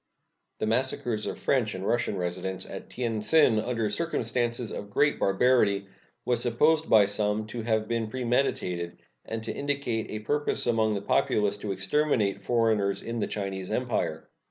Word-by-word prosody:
The -, -, -1 dB
massacres 115 Hz, -1 st, 0 dB
of -, -, -4 dB
French 115 Hz, -7 st, +1 dB
and 95 Hz, +1 st, -5 dB
Russian 120 Hz, -3 st, 0 dB
residents 90 Hz, +1 st, -3 dB
at -, -, -8 dB
Tien 115 Hz, -3 st, -2 dB
Tsin, 125 Hz, -3 st, +5 dB
under 115 Hz, -1 st, -1 dB
circumstances 120 Hz, -6 st, -1 dB
of 100 Hz, -, -6 dB
great 145 Hz, +8 st, +2 dB
barbarity, 100 Hz, -1 st, +3 dB, 0.4 s
was 125 Hz, -2 st, +1 dB
supposed 150 Hz, +7 st, +2 dB
by 105 Hz, -2 st, +7 dB
some 105 Hz, +1 st, -1 dB
to 120 Hz, -, -3 dB
have 110 Hz, -1 st, 0 dB
been 115 Hz, -1 st, -1 dB
premeditated, 115 Hz, -8 st, -1 dB, 0.3 s
and 110 Hz, 0 st, -4 dB
to 115 Hz, -, -4 dB
indicate 140 Hz, -6 st, -2 dB
a 110 Hz, 0 st, -6 dB
purpose 145 Hz, +4 st, 0 dB
among 110 Hz, -3 st, +2 dB
the 100 Hz, -, -4 dB
populace 105 Hz, 0 st, +1 dB
to 105 Hz, 0 st, -4 dB
exterminate 100 Hz, 0 st, +1 dB
foreigners 110 Hz, -3 st, +1 dB
in 115 Hz, 0 st, -4 dB
the -, -, 0 dB
Chinese 95 Hz, -2 st, -4 dB
Empire. 110 Hz, -9 st, -2 dB
110 Hz, 155 wpm, -27 LUFS, 100-125 Hz, 0.4 s, by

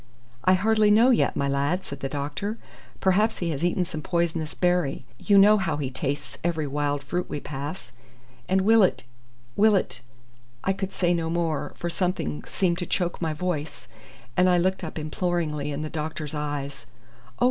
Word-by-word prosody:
"I 185 Hz, -, +5 dB
hardly 215 Hz, +2 st, +3 dB
know 225 Hz, +5 st, +6 dB
yet, 240 Hz, -, +2 dB
my 140 Hz, -, 0 dB
lad," 140 Hz, +7 st, 0 dB
said 140 Hz, -, -7 dB
the 135 Hz, -, -3 dB
doctor. 145 Hz, +10 st, -3 dB, 0.4 s
"Perhaps 210 Hz, +4 st, +3 dB
he 170 Hz, -2 st, -1 dB
has 150 Hz, +1 st, -3 dB
eaten 175 Hz, +1 st, +1 dB
some 155 Hz, -3 st, -6 dB
poisonous 165 Hz, -2 st, -1 dB
berry. 175 Hz, -7 st, +1 dB
You 200 Hz, -2 st, +4 dB
know 210 Hz, +2 st, +7 dB
how 165 Hz, -6 st, -1 dB
he 135 Hz, -3 st, -3 dB
tastes 140 Hz, +2 st, -4 dB
every 160 Hz, -3 st, 0 dB
wild 145 Hz, 0 st, -1 dB
fruit 180 Hz, 0 st, -3 dB
we 145 Hz, -, -3 dB
pass." 145 Hz, +5 st, -6 dB, 0.6 s
"And 190 Hz, +1 st, +3 dB
will 220 Hz, +3 st, +5 dB
it 190 Hz, -, +2 dB, 0.5 s
will 215 Hz, 0 st, +5 dB
it 190 Hz, -, -1 dB, 0.3 s
" 120 Hz, 0 st, -31 dB
I 195 Hz, -, +2 dB
could 195 Hz, 0 st, -4 dB
say 175 Hz, -1 st, +1 dB
no 165 Hz, -1 st, -1 dB
more, 165 Hz, -3 st, -1 dB
for 175 Hz, -, -3 dB
something 165 Hz, -, -2 dB
seemed 175 Hz, -2 st, 0 dB
to 175 Hz, -, -3 dB
choke 175 Hz, -2 st, -1 dB
my 160 Hz, -2 st, 0 dB
voice, 155 Hz, -5 st, -4 dB, 0.5 s
and 185 Hz, 0 st, +4 dB
I 180 Hz, -, +4 dB
looked 185 Hz, +2 st, +1 dB
up 160 Hz, -, -6 dB
imploringly 155 Hz, -2 st, -1 dB
in 145 Hz, +2 st, -3 dB
the -, -, -3 dB
doctor's 155 Hz, -1 st, -4 dB
eyes. 145 Hz, -4 st, -4 dB, 0.5 s
"Oh! -, -, -23 dB
165 Hz, 185 wpm, -25 LUFS, 145-185 Hz, 0.6 s, know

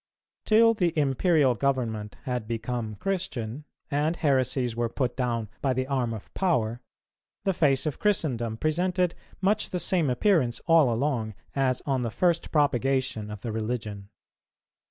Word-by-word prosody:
Till 230 Hz, +1 st, +6 dB
the 175 Hz, -6 st, 0 dB
Imperial 145 Hz, 0 st, +3 dB
Government 115 Hz, -5 st, -1 dB
had 125 Hz, -5 st, -3 dB
become 115 Hz, -1 st, -3 dB
Christian, 150 Hz, -, -3 dB, 0.3 s
and 150 Hz, +4 st, +1 dB
heresies 130 Hz, -5 st, +1 dB
were 120 Hz, 0 st, 0 dB
put 125 Hz, +1 st, -2 dB
down 120 Hz, -4 st, -1 dB
by 135 Hz, -2 st, +1 dB
the 130 Hz, +1 st, -1 dB
arm 130 Hz, -4 st, -1 dB
of 110 Hz, -3 st, -8 dB
power, 120 Hz, -, 0 dB, 0.6 s
the 195 Hz, -, +1 dB
face 145 Hz, -6 st, +2 dB
of 155 Hz, -, -2 dB
Christendom 125 Hz, -, 0 dB
presented 175 Hz, +4 st, +1 dB, 0.3 s
much 210 Hz, +3 st, +1 dB
the 180 Hz, -, -2 dB
same 170 Hz, -5 st, +1 dB
appearance 125 Hz, -, +2 dB
all 165 Hz, -7 st, +5 dB
along 115 Hz, -4 st, -1 dB, 0.2 s
as 130 Hz, -2 st, +1 dB
on 135 Hz, -3 st, 0 dB
the 120 Hz, -, -1 dB
first 170 Hz, +8 st, +1 dB
propagation 135 Hz, -6 st, +1 dB
of 105 Hz, -1 st, -7 dB
the 115 Hz, -, -4 dB
religion. 110 Hz, -3 st, -4 dB
130 Hz, 145 wpm, -27 LUFS, 115-160 Hz, 0.6 s, Till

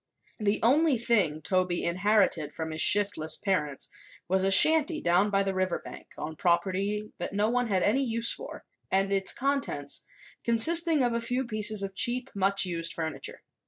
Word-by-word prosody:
The 210 Hz, -1 st, 0 dB
only 285 Hz, +3 st, +2 dB
thing 195 Hz, -10 st, 0 dB
Toby 185 Hz, -1 st, -1 dB
inherited 185 Hz, -4 st, 0 dB
from 160 Hz, 0 st, -6 dB
his 155 Hz, -, +2 dB
shiftless 200 Hz, -6 st, +4 dB
parents 150 Hz, -8 st, -2 dB, 0.4 s
was 190 Hz, +1 st, 0 dB
a 195 Hz, -, +1 dB
shanty 310 Hz, -, +6 dB
down 180 Hz, +4 st, +1 dB
by 200 Hz, -1 st, 0 dB
the 195 Hz, 0 st, -3 dB
river 185 Hz, -1 st, -2 dB
bank, -, -, -12 dB
on 155 Hz, +1 st, -7 dB
property 195 Hz, +5 st, -2 dB
that -, -, -5 dB
no 210 Hz, +3 st, 0 dB
one 245 Hz, 0 st, -1 dB
had 190 Hz, -4 st, -1 dB
any 265 Hz, +7 st, +1 dB
use 230 Hz, -2 st, 0 dB
for, -, -, -9 dB, 0.3 s
and 195 Hz, +1 st, 0 dB
its 195 Hz, -1 st, +2 dB
contents, 275 Hz, +1 st, -3 dB, 0.4 s
consisting 320 Hz, +6 st, +4 dB
of 240 Hz, -1 st, -1 dB
a 235 Hz, -, -2 dB
few 250 Hz, +3 st, -3 dB
pieces 215 Hz, -2 st, -1 dB
of 195 Hz, 0 st, -6 dB
cheap, 245 Hz, +5 st, 0 dB
much 195 Hz, 0 st, +2 dB
used 170 Hz, -2 st, -4 dB
furniture. 160 Hz, -3 st, -6 dB
200 Hz, 170 wpm, -27 LUFS, 185-235 Hz, 0.4 s, shanty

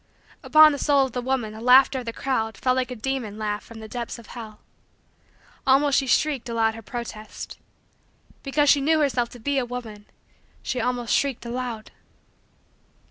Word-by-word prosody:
Upon 310 Hz, 0 st, +7 dB
the 285 Hz, -, -4 dB
soul 280 Hz, -2 st, +3 dB
of 265 Hz, -, -6 dB
the 250 Hz, -, -3 dB
woman 245 Hz, -4 st, -2 dB
the 220 Hz, -, -9 dB
laughter 260 Hz, +2 st, +6 dB
of 250 Hz, -, -8 dB
the 230 Hz, -, -3 dB
crowd 225 Hz, -4 st, -2 dB
fell 255 Hz, -, +1 dB
like 255 Hz, -1 st, -1 dB
a 250 Hz, -, -5 dB
demon 240 Hz, -3 st, -3 dB
laugh 210 Hz, -1 st, -3 dB
from 225 Hz, -1 st, -12 dB
the 220 Hz, -, -8 dB
depths 240 Hz, +1 st, -5 dB
of 235 Hz, -, -13 dB
hell. 220 Hz, -3 st, -9 dB, 1.1 s
Almost 275 Hz, +1 st, +4 dB
she 270 Hz, -, -3 dB
shrieked 270 Hz, -2 st, +1 dB
aloud 225 Hz, -1 st, +1 dB
her 225 Hz, -, -9 dB
protest. 225 Hz, -1 st, -8 dB, 0.8 s
Because 290 Hz, +1 st, +1 dB
she 285 Hz, 0 st, +5 dB
knew 315 Hz, +3 st, +3 dB
herself 250 Hz, -5 st, +1 dB
to 245 Hz, -, -12 dB
be 280 Hz, +4 st, 0 dB
a -, -, 0 dB
woman, 230 Hz, -4 st, -7 dB, 0.6 s
she 250 Hz, -, -2 dB
almost 245 Hz, -2 st, -1 dB
shrieked 275 Hz, -4 st, 0 dB
aloud. 235 Hz, -2 st, -5 dB
245 Hz, 180 wpm, -24 LUFS, 225-270 Hz, 1.1 s, Upon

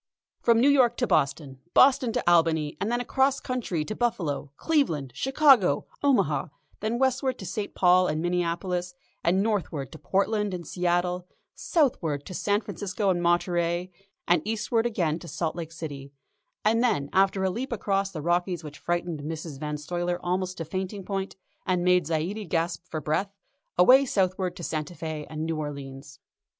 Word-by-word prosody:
From 230 Hz, -1 st, +4 dB
New 255 Hz, -, +5 dB
York 255 Hz, -4 st, +4 dB
to 250 Hz, -, +1 dB
Boston, 140 Hz, -, 0 dB, 0.2 s
Boston 255 Hz, -2 st, +5 dB
to -, -, -2 dB
Albany, 165 Hz, -3 st, +3 dB
and 205 Hz, +4 st, 0 dB
then 240 Hz, -, +1 dB
across 265 Hz, +2 st, +1 dB
country 225 Hz, -, -2 dB
to 215 Hz, -, -4 dB
Buffalo, 165 Hz, -, -1 dB
Cleveland, 165 Hz, -, 0 dB
Chicago, 260 Hz, -, +4 dB, 0.2 s
Omaha 280 Hz, -3 st, +2 dB, 0.3 s
then 220 Hz, +2 st, -1 dB
westward 260 Hz, 0 st, +1 dB
to 190 Hz, -, -8 dB
St. 200 Hz, +4 st, -4 dB
Paul 180 Hz, 0 st, +5 dB
and 155 Hz, -1 st, -1 dB
Minneapolis, 175 Hz, +1 st, -1 dB, 0.3 s
and 190 Hz, +3 st, +3 dB
northward 180 Hz, -, -2 dB
to 160 Hz, -, -11 dB
Portland 205 Hz, 0 st, 0 dB
and 175 Hz, -2 st, -7 dB
Seattle, 180 Hz, +1 st, -1 dB, 0.3 s
southward 170 Hz, -, 0 dB
to -, -, -8 dB
San 205 Hz, +3 st, +1 dB
Francisco 200 Hz, -1 st, -2 dB
and 175 Hz, -1 st, 0 dB
Monterey, 175 Hz, +1 st, +1 dB, 0.4 s
then 175 Hz, -2 st, +4 dB
eastward 225 Hz, +2 st, 0 dB
again 170 Hz, -8 st, -1 dB
to 170 Hz, -, -11 dB
Salt 165 Hz, -1 st, -2 dB
Lake 165 Hz, -2 st, -6 dB
City, 145 Hz, -4 st, -7 dB, 0.5 s
and 225 Hz, +2 st, +3 dB
then, 200 Hz, -, +1 dB
after 195 Hz, 0 st, +3 dB
a 190 Hz, -, +1 dB
leap 250 Hz, +7 st, -4 dB
across 195 Hz, -3 st, 0 dB
the 155 Hz, -6 st, -7 dB
Rockies 175 Hz, 0 st, 0 dB
which 150 Hz, -1 st, -9 dB
frightened 175 Hz, -2 st, -2 dB
Mrs. 155 Hz, -1 st, -6 dB
Van 150 Hz, 0 st, -3 dB
Stuyler 175 Hz, +3 st, -2 dB
almost 185 Hz, +1 st, -1 dB
to 165 Hz, -, -4 dB
fainting 190 Hz, +3 st, -4 dB
point 195 Hz, 0 st, -3 dB, 0.3 s
and 180 Hz, -2 st, 0 dB
made 180 Hz, -3 st, +4 dB
Zaidie 170 Hz, +5 st, -2 dB
gasp 170 Hz, +1 st, -1 dB
for 155 Hz, -, -4 dB
breath, 190 Hz, +7 st, -1 dB, 0.4 s
away 255 Hz, +10 st, +7 dB
southward 185 Hz, -3 st, 0 dB
to 175 Hz, -, -8 dB
Santa 155 Hz, +2 st, -3 dB
Fé 155 Hz, -2 st, -5 dB
and 155 Hz, 0 st, -4 dB
New 165 Hz, -1 st, -2 dB
Orleans. 140 Hz, -2 st, -7 dB
180 Hz, 165 wpm, -27 LUFS, 160-210 Hz, 0.5 s, away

